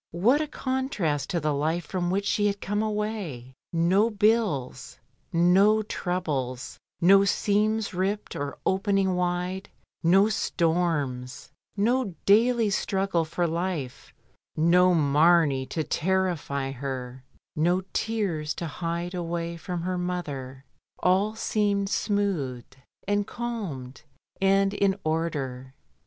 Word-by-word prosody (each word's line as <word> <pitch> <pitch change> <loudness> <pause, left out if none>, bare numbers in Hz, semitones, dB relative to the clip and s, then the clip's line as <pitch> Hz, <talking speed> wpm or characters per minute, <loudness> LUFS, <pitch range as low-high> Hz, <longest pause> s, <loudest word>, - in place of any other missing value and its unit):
What 245 - +4
a 310 - -2
contrast 260 - -2
to 175 - 0
the 150 -1 0
life 160 +4 -1
from 175 0 -2
which 200 +2 0
she 205 0 +2
had 200 0 -1
come 205 +2 -1
away 210 - -3
— - - -67
no 180 +6 +3
bills, 205 - 0 0.3
no 195 +5 +4
troubles, 145 - -3 0.2
no 195 +3 +6
seams 210 +1 +1
ripped 195 +3 -2
and 145 0 -3
opening 195 -1 +1
wide, 180 +1 -2 0.3
no 190 +4 +5
storms, 160 - -1 0.3
no 225 -2 +1
daily 225 +1 +4
struggle 195 -3 0
for 165 +2 -1
life, 170 -5 -3 0.5
noMamey 160 -4 +4
to 160 - -2
terrify 165 -7 -1
her, 130 -1 -6 0.3
no 175 +4 +2
tears 190 -9 -1
to 170 - -4
hide 170 +3 -4
away 170 -1 -3
from 175 0 -5
her 180 0 -2
mother. 140 -7 -4 0.3
All 195 +4 +2
seemed 205 -3 0
smoothed, 175 - -1 0.3
and 205 0 +1
calmed, 195 - -5 0.4
and 195 +1 +3
in 200 -1 +2
order. 140 -5 -3
180 Hz, 115 wpm, -26 LUFS, 155-200 Hz, 0.5 s, no